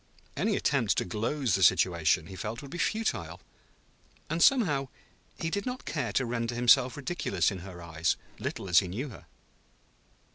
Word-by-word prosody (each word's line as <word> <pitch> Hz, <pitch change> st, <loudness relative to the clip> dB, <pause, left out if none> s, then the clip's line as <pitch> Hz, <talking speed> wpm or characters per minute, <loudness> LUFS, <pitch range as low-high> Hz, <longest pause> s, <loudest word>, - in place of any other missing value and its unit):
Any -, -, +1 dB
attempt -, -, +1 dB
to -, -, +1 dB
gloze 115 Hz, +6 st, -1 dB
the 95 Hz, -, +1 dB
situation, 85 Hz, -3 st, +3 dB
he 95 Hz, +2 st, -10 dB
felt, 105 Hz, +7 st, -5 dB
would 140 Hz, -, -10 dB
be 175 Hz, -, -6 dB
futile. 225 Hz, +4 st, -1 dB, 0.9 s
And, 165 Hz, +1 st, -1 dB
somehow, 165 Hz, -, +4 dB, 0.5 s
he 165 Hz, -, -3 dB
did 200 Hz, +6 st, -2 dB
not 250 Hz, 0 st, -5 dB
care 140 Hz, -7 st, -2 dB
to 130 Hz, -, +1 dB
render 115 Hz, 0 st, -2 dB
himself 120 Hz, +1 st, +4 dB
ridiculous 145 Hz, -4 st, 0 dB
in 95 Hz, -, -5 dB
her 90 Hz, -1 st, -10 dB
eyes, 80 Hz, 0 st, 0 dB, 0.2 s
little -, -, -4 dB
as 90 Hz, -1 st, +6 dB
he 95 Hz, -, -3 dB
knew 120 Hz, +11 st, -4 dB
her. 115 Hz, -, -13 dB
120 Hz, 170 wpm, -29 LUFS, 95-150 Hz, 0.9 s, as